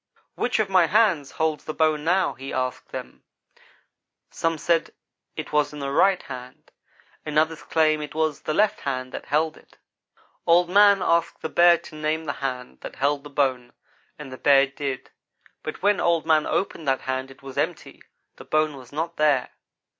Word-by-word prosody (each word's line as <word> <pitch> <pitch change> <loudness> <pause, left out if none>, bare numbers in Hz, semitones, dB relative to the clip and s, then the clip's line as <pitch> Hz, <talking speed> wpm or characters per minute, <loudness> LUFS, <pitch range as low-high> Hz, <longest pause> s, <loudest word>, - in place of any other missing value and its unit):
"'Which 245 - -1
of 215 -2 +1
my 185 -3 +4
hands 185 -8 +2
holds 160 -1 -1
the 155 - -5
bone 155 -2 +2
now?' 180 +4 +2
he 135 +1 -8
asked 130 0 -3
them. - - -8 1.1
"Some 165 -1 -1
said 165 +1 0 0.4
it - - -6
was 150 0 +1
in - - -8
the 140 -1 -4
right 185 +5 +3
hand 125 -1 -10 0.5
and 150 -1 -3
others 160 +1 +1
claimed 155 -1 +2
that - - -3
it 150 - -14
was 155 -2 0
the 155 - -2
left 210 0 +2
hand 130 -2 -3
that - - -7
held 155 +1 0
it. - - -22 0.7
Old 175 +1 +4
man 200 0 +6
asked 170 0 +1
the 160 - -2
Bear 175 0 +6
to - - -14
name 155 +1 -2
the 145 - -2
hand 125 - -4
that - - -8
held 140 +1 0
the 145 - -10
bone, 130 -4 -1 0.4
and 150 -3 -9
the 130 - -9
Bear 140 -1 +5
did; 135 -1 -5 0.5
but - - -7
when 205 0 +3
Old 170 -2 +1
man 155 -1 +3
opened 165 -5 -2
that 135 -1 +1
hand 130 0 -3
it 135 +1 -16
was 135 -1 -9
empty - - -3 0.4
the - - -11
bone 155 -2 0
was 125 -2 -13
not 165 +3 -4
there. 150 -4 +2
155 Hz, 190 wpm, -24 LUFS, 135-165 Hz, 1.1 s, man